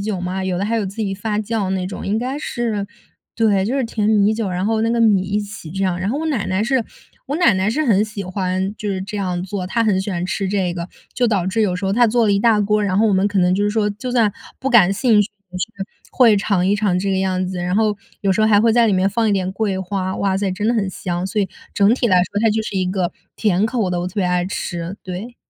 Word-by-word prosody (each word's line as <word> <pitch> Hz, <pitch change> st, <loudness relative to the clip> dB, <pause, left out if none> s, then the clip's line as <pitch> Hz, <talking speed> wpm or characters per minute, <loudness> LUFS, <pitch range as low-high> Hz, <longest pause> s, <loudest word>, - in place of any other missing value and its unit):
酒 200 Hz, -3 st, -3 dB
嘛， 185 Hz, +1 st, -3 dB
有 180 Hz, -1 st, -1 dB
的 195 Hz, -, -1 dB
还 225 Hz, +3 st, 0 dB
有 215 Hz, -, 0 dB
自 195 Hz, +3 st, -8 dB
己 205 Hz, -3 st, -2 dB
发 210 Hz, +1 st, -2 dB
酵 215 Hz, -2 st, -2 dB
那 185 Hz, -1 st, -1 dB
种， 195 Hz, -, -6 dB
应 210 Hz, +3 st, 0 dB
该 260 Hz, +4 st, -3 dB
是 225 Hz, -8 st, -2 dB, 0.5 s
对， 210 Hz, -4 st, +2 dB
就 240 Hz, +7 st, -1 dB
是 265 Hz, -, 0 dB
甜 215 Hz, -2 st, -1 dB
米 210 Hz, -1 st, +4 dB
酒， 220 Hz, -3 st, -2 dB
然 180 Hz, +1 st, -2 dB
后 220 Hz, +1 st, +1 dB
那 230 Hz, -, +1 dB
个 235 Hz, 0 st, +1 dB
米 210 Hz, -5 st, +4 dB
一 200 Hz, +2 st, -1 dB
起 205 Hz, -5 st, -8 dB
这 195 Hz, +2 st, -3 dB
样。 180 Hz, -1 st, 0 dB
然 185 Hz, +2 st, -2 dB
后 280 Hz, -, -1 dB
我 320 Hz, -, -2 dB
奶 265 Hz, -10 st, -1 dB
奶 190 Hz, +3 st, 0 dB
是 250 Hz, -1 st, +1 dB, 0.4 s
我 285 Hz, +3 st, -2 dB
奶 335 Hz, -, +4 dB
奶 190 Hz, +2 st, 0 dB
是 305 Hz, +6 st, 0 dB
很 210 Hz, -4 st, +3 dB
喜 215 Hz, -2 st, -6 dB
欢， 185 Hz, +1 st, -2 dB
就 210 Hz, -, -4 dB
是 190 Hz, -1 st, -2 dB
这 205 Hz, +2 st, -6 dB
样 180 Hz, -3 st, -2 dB
做， 190 Hz, -1 st, -4 dB
她 230 Hz, +5 st, 0 dB
很 205 Hz, -4 st, +2 dB
喜 195 Hz, +2 st, -4 dB
欢 175 Hz, -1 st, -2 dB
吃 195 Hz, +1 st, -2 dB
这 190 Hz, -3 st, 0 dB
个， 170 Hz, 0 st, -5 dB, 0.3 s
就 245 Hz, -, +2 dB
导 200 Hz, -6 st, 0 dB
致 215 Hz, +4 st, 0 dB
有 185 Hz, -4 st, +1 dB
时 195 Hz, +2 st, -4 dB
候 195 Hz, -, +1 dB
她 240 Hz, +2 st, +4 dB
做 230 Hz, +1 st, +2 dB
了 205 Hz, -, +3 dB
一 200 Hz, -, +2 dB
大 215 Hz, 0 st, +3 dB
锅， 210 Hz, +1 st, +1 dB
然 190 Hz, -1 st, 0 dB
后 220 Hz, -, +4 dB
我 205 Hz, -, +2 dB
们 190 Hz, +1 st, +3 dB
可 205 Hz, -1 st, 0 dB
能 180 Hz, 0 st, +3 dB
就 205 Hz, -, +1 dB
是 205 Hz, -, +1 dB
说 215 Hz, -1 st, +1 dB
就 245 Hz, +5 st, -6 dB
算 225 Hz, -5 st, +3 dB, 0.3 s
不 270 Hz, -, -2 dB
感 210 Hz, -6 st, +6 dB
兴 220 Hz, -1 st, +3 dB
趣 205 Hz, -, 0 dB, 0.2 s
也 180 Hz, -, -6 dB
是， -, -, -1 dB, 0.4 s
会 235 Hz, -5 st, +5 dB
尝 195 Hz, -3 st, +1 dB
一 200 Hz, -, +3 dB
尝 200 Hz, -3 st, +1 dB
这 195 Hz, +1 st, -1 dB
个 190 Hz, -, +1 dB
样 185 Hz, -1 st, 0 dB
子， 185 Hz, -1 st, -4 dB
然 180 Hz, +1 st, -1 dB
后 215 Hz, -1 st, +2 dB, 0.3 s
有 195 Hz, -1 st, +3 dB
时 200 Hz, -, 0 dB
候 215 Hz, -, +4 dB
还 205 Hz, -2 st, +5 dB
会 225 Hz, 0 st, +3 dB
在 235 Hz, -1 st, +4 dB
里 210 Hz, -, +2 dB
面 190 Hz, +1 st, +2 dB
放 225 Hz, +2 st, +1 dB
一 205 Hz, -, +2 dB
点 185 Hz, -1 st, 0 dB
桂 195 Hz, -1 st, -1 dB
花。 190 Hz, 0 st, -3 dB
哇 195 Hz, -1 st, 0 dB
塞， 200 Hz, -1 st, -1 dB
真 205 Hz, +3 st, -2 dB
的 235 Hz, -, +3 dB
很 210 Hz, -4 st, 0 dB
香， 180 Hz, -1 st, -3 dB
所 210 Hz, +2 st, -1 dB
以 -, -, -1 dB, 0.3 s
整 200 Hz, +2 st, +4 dB
体 250 Hz, -, 0 dB
来 185 Hz, -, +4 dB
说 205 Hz, -, -3 dB
它 225 Hz, -, +4 dB
就 220 Hz, +1 st, 0 dB
是 205 Hz, -, -6 dB
一 185 Hz, -, 0 dB
个 185 Hz, -2 st, -1 dB, 0.2 s
甜 205 Hz, -1 st, +2 dB
口 225 Hz, -5 st, -1 dB
的， 175 Hz, -1 st, -1 dB
我 180 Hz, -, -2 dB
特 -, -, -16 dB
别 200 Hz, -3 st, 0 dB
爱 180 Hz, 0 st, +1 dB
吃， 175 Hz, -1 st, -4 dB
对。 195 Hz, +7 st, -7 dB
200 Hz, 315 characters per minute, -20 LUFS, 185-220 Hz, 0.5 s, 感